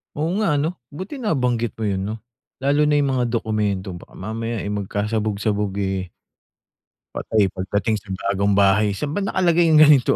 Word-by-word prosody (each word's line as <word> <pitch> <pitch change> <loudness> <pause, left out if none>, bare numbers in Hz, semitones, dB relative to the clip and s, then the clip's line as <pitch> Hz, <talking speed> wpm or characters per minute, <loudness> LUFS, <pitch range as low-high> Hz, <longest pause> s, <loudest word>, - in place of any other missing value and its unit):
Oo 150 +2 -1 0.2
nga, 150 -8 +2
'no. 160 +5 -1 0.2
Buti 185 - -7
nabanggit 125 - 0
mo 110 - 0
yun 95 -1 -1
'no, 105 +3 -3 0.4
lalo 140 +2 +2
na 150 0 +3
yung 140 -1 +1
mga 120 -2 0
dokumento 105 -5 -1
baka 85 - -13
mamaya 115 +3 -4
eh, - - -4
magkasabog-sabog 105 0 -1
eh 95 -2 -2 1.0
patay, 105 -4 +1
pagdating 100 +3 -1
sa 105 - -24 0.2
bagong 100 0 +1
bahay. 100 +1 +3
Saan 145 +8 -3
ba 180 - -1
nakalagay 175 -4 +2
yung 155 -1 +6
ganito? 145 -4 +5
110 Hz, 165 wpm, -22 LUFS, 100-145 Hz, 1.0 s, yung